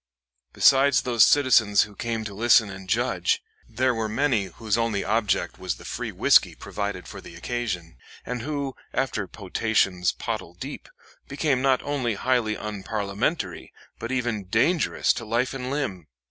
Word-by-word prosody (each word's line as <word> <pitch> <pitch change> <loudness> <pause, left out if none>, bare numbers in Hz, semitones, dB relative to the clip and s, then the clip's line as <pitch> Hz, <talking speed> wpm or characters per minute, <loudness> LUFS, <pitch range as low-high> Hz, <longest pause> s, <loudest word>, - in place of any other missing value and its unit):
Besides 135 - +5
those 120 -3 +4
citizens 115 -8 +5
who 105 - -10
came 115 0 -3
to 105 -2 -6
listen 110 -1 +4
and 95 -1 -10
judge, - - +1 0.3
there 125 +3 +1
were 110 -2 -2
many 120 -3 +1
whose 105 +3 -2
only 115 -3 0
object 105 0 0
was - - -2
the - - -14
free - - -4
whisky - - +4
provided 100 -3 -5
for - - -9
the 85 - -12
occasion, 90 -5 -4 0.3
and 125 -1 -4
who, 140 0 -3 0.2
after 120 -7 -1
potations 95 -3 0
pottle - - -5
deep, - - -8 0.4
became 140 -2 0
not 135 -1 +2
only 130 -6 -1
highly 120 -1 +1
unparliamentary 105 - -3 0.3
but 115 - -5
even 120 -6 -1
dangerous 120 - +2
to 120 - -6
life 120 +4 0
and 130 -1 -4
limb. 115 - -3
115 Hz, 150 wpm, -25 LUFS, 100-130 Hz, 0.4 s, Besides